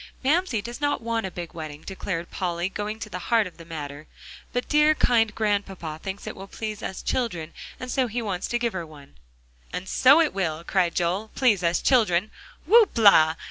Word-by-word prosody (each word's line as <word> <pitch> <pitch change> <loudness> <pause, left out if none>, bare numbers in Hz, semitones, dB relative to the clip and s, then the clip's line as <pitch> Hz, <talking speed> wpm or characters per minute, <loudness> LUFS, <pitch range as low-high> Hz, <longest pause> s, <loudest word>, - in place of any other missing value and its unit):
"Mamsie 285 - +1
does 240 +4 -7
not 290 -5 0
want 230 -3 -1
a - - -5
big 175 -1 -7
wedding," 155 -2 -8
declared 185 -3 -5
Polly, 175 -1 -2
going 210 +2 -4
to 225 - -6
the 180 -3 -6
heart 230 -3 +4
of 185 - -10
the 165 - -12
matter, 150 -2 -7 0.4
"but 245 0 -2
dear 300 +1 +4
kind 225 -6 +2
Grandpapa 195 -7 -2
thinks 195 +1 -6
it - - -6
will 195 +1 -9
please 215 0 -6
us 190 - -5
children, 175 -11 -2 0.3
and 255 0 -5
so 260 -2 +1
he 235 +2 -3
wants 200 -6 -3
to 240 - 0
give 235 -1 -1
her 180 -2 -3
one." 150 -3 -14 0.6
"And 190 - -5
so 265 +10 +6
it 325 -2 +2
will," 165 -4 -2
cried 175 -2 +1
Joel, 185 +5 -1
"please 220 -9 +3
us 170 0 +1
children. 210 -6 +3 0.3
Whoop 430 - +5
la! 160 -8 +6
200 Hz, 200 wpm, -25 LUFS, 170-235 Hz, 0.6 s, so